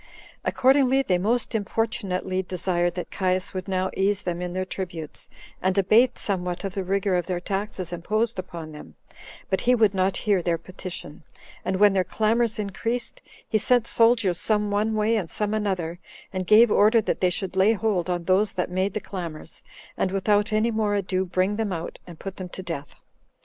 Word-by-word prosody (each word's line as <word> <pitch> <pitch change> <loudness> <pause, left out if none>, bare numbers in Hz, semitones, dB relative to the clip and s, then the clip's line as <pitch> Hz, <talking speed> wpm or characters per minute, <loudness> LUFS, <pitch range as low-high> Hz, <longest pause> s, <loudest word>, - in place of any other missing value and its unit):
Accordingly, 265 0 +3
they 180 -7 +1
most 225 +6 0
importunately 200 -3 -1
desired 175 -1 -1
that 180 - -5
Caius 185 -1 0
would 185 0 -4
now 185 -1 0
ease 195 +1 +1
them 175 -1 -3
in 180 0 -4
their 185 0 -1
tributes, 175 -5 -6 0.3
and 190 +1 +1
abate 225 +6 +4
somewhat 180 -2 -2
of 195 -2 -3
the 195 - -2
rigor 195 +1 0
of 175 -2 -1
their 180 -2 -1
taxes 195 -2 -4
imposed 215 +5 -1
upon 170 -3 -7
them; 150 - -11 0.6
but 190 - +1
he 250 +1 +4
would 215 -4 +3
not 190 0 +1
hear 200 -4 +1
their 170 -1 0
petition; 175 -3 -8 0.4
and 190 - -1
when 205 +1 +5
their 190 -1 +2
clamors 220 +4 +1
increased, 225 +4 -3 0.3
he 215 - +1
sent 245 +2 +3
soldiers 230 -7 +3
some 210 -1 +1
one 215 +2 +1
way 215 +2 +2
and 190 -7 -2
some 210 0 -2
another, 185 -5 -2 0.3
and 185 -1 -3
gave 215 +1 +7
order 215 +3 +5
that 220 - -1
they 185 - +3
should 185 +1 -3
lay 195 +4 +5
hold 205 -5 0
on 175 -1 -1
those 195 +4 +2
that 180 -1 -2
made 185 +2 0
the - - +1
clamors, 170 -6 -7 0.3
and 190 - 0
without 205 +2 +1
any 215 +2 +2
more 215 -2 0
ado 190 -1 0
bring 185 +3 0
them 220 -3 -1
out, 170 -2 -5
and 170 -2 -10
put 195 +2 -7
them 185 -1 -6
to 190 - -7
death. 155 -5 -6
195 Hz, 190 wpm, -25 LUFS, 180-215 Hz, 0.6 s, gave